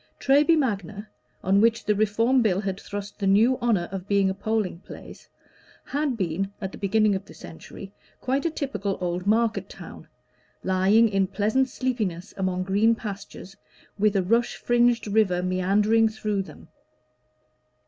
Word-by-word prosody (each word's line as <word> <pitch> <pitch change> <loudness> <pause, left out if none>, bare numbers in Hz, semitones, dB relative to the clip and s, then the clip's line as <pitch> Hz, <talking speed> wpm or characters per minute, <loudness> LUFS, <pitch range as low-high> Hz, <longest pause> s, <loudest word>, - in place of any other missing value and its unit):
Treby 295 +4 +4
Magna, 210 - -2 0.4
on 195 +2 +3
which 230 +1 +2
the 210 - +2
Reform 225 +5 +2
Bill 195 -5 +1
had 195 -1 -4
thrust 205 0 -7
the 200 - -1
new 225 +7 +4
honor 215 -8 +1
of 195 -1 -6
being 200 -1 +2
a - - -2
polling 205 -3 -2
place, - - -12 0.6
had 285 -3 -2
been, 190 +1 -2
at 190 -1 -5
the - - -11
beginning 210 +1 +2
of 190 0 -3
the - - -15
century, 195 +4 -11 0.3
quite 270 +2 -1
a 335 - +1
typical 265 - -3
old 180 +1 -3
market 225 +1 +1
town, - - -11 0.6
lying 190 +5 +3
in 195 -2 0
pleasant 220 +7 0
sleepiness 215 -10 -3
among 185 -1 -1
green 205 +5 +2
pastures, 200 -3 -8 0.4
with 210 0 +2
a 190 - +2
rush 230 +6 +1
fringed 240 0 +2
river 200 -4 +1
meandering 205 +5 +2
through 215 -2 -2
them. 185 -3 -12
205 Hz, 155 wpm, -25 LUFS, 190-230 Hz, 0.6 s, Treby